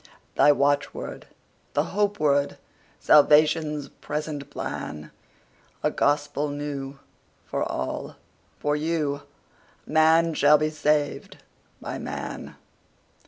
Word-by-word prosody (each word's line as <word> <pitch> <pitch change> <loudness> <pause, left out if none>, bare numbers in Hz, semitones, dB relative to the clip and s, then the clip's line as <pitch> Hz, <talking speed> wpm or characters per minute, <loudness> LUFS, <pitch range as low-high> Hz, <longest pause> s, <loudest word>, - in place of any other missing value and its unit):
The 145 - +6
watchword, 145 +1 -1 0.5
the - - +3
hope 205 0 +1
word, 140 -1 +2 0.4
Salvation's 150 0 +4
present 150 -1 -5
plan?A 75 0 -7
gospel 145 0 0
new, 145 -1 -5 0.5
for - - -2
all—for 145 - -5
you:Man 160 +1 0
shall 150 0 +5
be 155 +1 -1
saved 150 -1 0 0.4
by - - -6
man. - - -6
150 Hz, 80 wpm, -25 LUFS, 145-155 Hz, 0.5 s, The